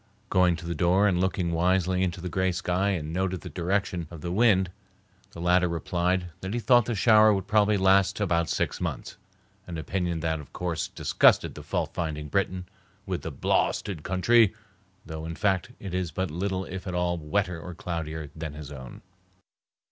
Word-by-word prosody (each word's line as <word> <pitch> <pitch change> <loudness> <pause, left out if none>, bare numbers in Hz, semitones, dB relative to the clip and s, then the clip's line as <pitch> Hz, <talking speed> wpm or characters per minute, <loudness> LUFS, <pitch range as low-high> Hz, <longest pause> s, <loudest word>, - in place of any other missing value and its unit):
Going 90 -2 +4
to 85 +1 -9
the 85 - -2
door 90 +5 +3
and 90 -3 +1
looking 95 -2 0
wisely 90 +2 +1
into 90 -2 -1
the 90 - -4
gray 95 +2 0
sky 90 +2 0
and 80 -5 -2
noting 95 +1 -1
the 80 - -9
direction 90 -1 -1
of 85 -3 -10
the 85 - -4
wind, 95 -3 +3 0.6
the - - -12
latter 90 +1 +3
replied 90 +2 -1
that 95 +4 -4
he - - 0
thought 120 -1 +4
the 120 - -2
shower 110 +1 +6
would 95 -3 0
probably 105 0 +3
last 95 +1 +3
about 85 -5 +1
six - - -1
months, - - -4 0.5
an 85 -2 -5
opinion 85 0 -2
that 80 -1 -1
of 75 - -12
course 85 -3 -2
disgusted - - +3
the - - -9
fault - - -2
finding 75 -3 -3
Briton 95 0 -1 0.4
with - - -3
the - - -5
"blawsted 100 -7 0
country," 100 +5 +3 0.5
though 80 -1 -6
in 80 +1 -5
fact 95 +3 0
it 95 -4 -7
is 90 -2 -1
but 95 -1 -3
little 95 +3 -2
if 95 +1 -7
at 90 - -3
all 90 -1 0
wetter 85 +2 -1
or 90 0 -8
cloudier 80 -4 -5
than 80 -2 -5
his 75 -1 -9
own. 65 -3 -10
90 Hz, 185 wpm, -27 LUFS, 85-95 Hz, 0.6 s, shower